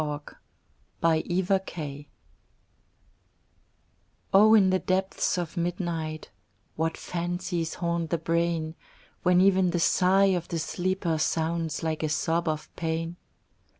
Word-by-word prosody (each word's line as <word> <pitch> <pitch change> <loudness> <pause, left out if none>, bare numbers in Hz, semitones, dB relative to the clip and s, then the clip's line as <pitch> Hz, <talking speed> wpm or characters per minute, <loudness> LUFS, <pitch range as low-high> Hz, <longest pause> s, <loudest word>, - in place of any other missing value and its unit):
IN 155 - -1
THE 150 - -2 0.8
DARK 165 -3 -1 2.2
O 215 +3 +7
In 190 -3 +5
the 185 - +2
depths 190 0 0
of 175 -1 -4
midnight 170 -3 -3 0.4
What 160 +1 -1
fancies 175 -1 -3
haunt 170 -2 -2
the 170 - +1
brain! 165 -1 -1 0.5
When 180 0 +4
even 190 -1 +4
the 175 0 0
sigh 190 +3 +4
of 175 -2 -2
the 170 - -3
sleeper 175 0 -1
Sounds 160 0 -1
like 160 -1 -1
a 155 - 0
sob 165 +2 0
of 155 -1 -3
pain. 165 +1 -3
170 Hz, 115 wpm, -27 LUFS, 160-185 Hz, 2.2 s, O